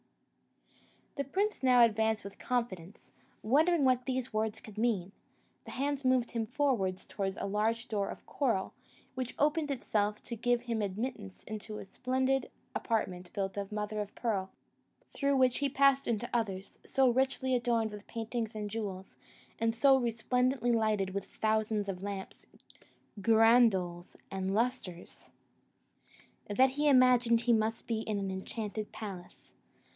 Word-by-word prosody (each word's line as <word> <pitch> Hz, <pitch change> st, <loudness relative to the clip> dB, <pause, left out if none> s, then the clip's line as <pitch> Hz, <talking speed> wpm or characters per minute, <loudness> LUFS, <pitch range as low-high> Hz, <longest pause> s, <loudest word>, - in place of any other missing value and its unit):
The 280 Hz, -, -1 dB
prince 405 Hz, +9 st, -1 dB
now 250 Hz, -2 st, +6 dB
advanced 220 Hz, -1 st, +2 dB
with 200 Hz, 0 st, -10 dB
confidence, 210 Hz, -7 st, -3 dB, 0.3 s
wondering 300 Hz, +6 st, +3 dB
what 255 Hz, 0 st, +2 dB
these 260 Hz, -2 st, -2 dB
words 215 Hz, 0 st, -1 dB
could 215 Hz, -1 st, -10 dB
mean; 205 Hz, -6 st, 0 dB, 0.5 s
the -, -, -9 dB
hands 285 Hz, +1 st, -2 dB
moved 255 Hz, -2 st, +2 dB
him 225 Hz, -2 st, -2 dB
forward 240 Hz, -8 st, +1 dB
towards 195 Hz, 0 st, -4 dB
a -, -, -2 dB
large 220 Hz, +4 st, 0 dB
door 205 Hz, -3 st, -1 dB
of -, -, -9 dB
coral, 230 Hz, -9 st, -1 dB, 0.4 s
which 255 Hz, -2 st, -4 dB
opened 300 Hz, +1 st, +1 dB
of 275 Hz, -, -1 dB
itself 210 Hz, -2 st, -1 dB
to 235 Hz, -, -5 dB
give 245 Hz, +1 st, +1 dB
him 230 Hz, -2 st, -2 dB
admittance 200 Hz, -, -4 dB
into 215 Hz, 0 st, -7 dB
a -, -, -7 dB
splendid 260 Hz, +6 st, 0 dB, 0.2 s
apartment 180 Hz, -6 st, -2 dB
built 195 Hz, -1 st, -2 dB
of 200 Hz, 0 st, -4 dB
mother 210 Hz, 0 st, -3 dB
o' 210 Hz, -, -2 dB
pearl, 200 Hz, -5 st, -1 dB, 0.6 s
through 280 Hz, -1 st, +1 dB
which 255 Hz, -2 st, +3 dB
he 280 Hz, 0 st, +1 dB
passed 275 Hz, 0 st, +3 dB
into 235 Hz, 0 st, -1 dB
others, 195 Hz, -5 st, -2 dB
so 270 Hz, -1 st, +2 dB
richly 260 Hz, +1 st, +1 dB
adorned 235 Hz, -3 st, +1 dB
with 210 Hz, 0 st, -10 dB
paintings 225 Hz, -1 st, -4 dB
and 210 Hz, -1 st, -4 dB
jewels, 195 Hz, -4 st, -5 dB, 0.4 s
and 225 Hz, 0 st, +1 dB
so 270 Hz, +2 st, +6 dB
resplendently 250 Hz, +1 st, +1 dB
lighted 215 Hz, -4 st, +1 dB
with 200 Hz, -1 st, -3 dB
thousands 215 Hz, -1 st, 0 dB
of 185 Hz, -2 st, -4 dB
lamps, 200 Hz, -1 st, -6 dB, 0.7 s
girandoles, 220 Hz, -6 st, +4 dB, 0.2 s
and 190 Hz, 0 st, -2 dB
lustres, 230 Hz, -7 st, -3 dB, 1.2 s
that 255 Hz, +6 st, +4 dB
he 295 Hz, +3 st, 0 dB
imagined 250 Hz, -3 st, +5 dB
he 235 Hz, 0 st, +3 dB
must 220 Hz, 0 st, 0 dB
be 225 Hz, -2 st, -1 dB
in 215 Hz, -2 st, -2 dB
an 195 Hz, -1 st, -2 dB
enchanted 210 Hz, +2 st, -5 dB
palace. 190 Hz, -5 st, -9 dB
225 Hz, 150 wpm, -31 LUFS, 205-255 Hz, 1.2 s, now